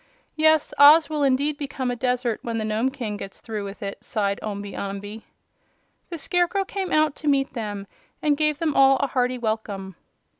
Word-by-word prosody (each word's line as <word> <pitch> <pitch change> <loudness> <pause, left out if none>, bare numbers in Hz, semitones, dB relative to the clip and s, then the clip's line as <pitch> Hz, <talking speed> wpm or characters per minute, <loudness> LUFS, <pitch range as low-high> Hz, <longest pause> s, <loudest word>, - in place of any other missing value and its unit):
"Yes, 315 -1 +3
Oz 295 +2 +8
will 300 -1 -1
indeed 280 +2 +1
become 270 -3 -3
a - - -2
desert 250 -1 -1
when 230 -1 -3
the 220 - -2
Nome 220 +4 0
King 235 -6 -5
gets 195 -1 -8
through 215 -3 -5
with 200 +1 -8
it," 200 0 -6
sighed 200 -3 -1
Omby 205 -1 -5
Amby. 200 +2 -6 0.8
The 340 - -5
Scarecrow 355 +5 0
came 385 -1 -4
out 305 -2 +2
to 305 - -6
meet 275 -1 +2
them 205 -5 -5 0.3
and 300 -1 +2
gave 305 0 +1
them 310 -1 -1
all 270 0 +6
a - - 0
hearty 250 -1 0
welcome. 215 -5 -4
255 Hz, 185 wpm, -24 LUFS, 215-300 Hz, 0.8 s, Oz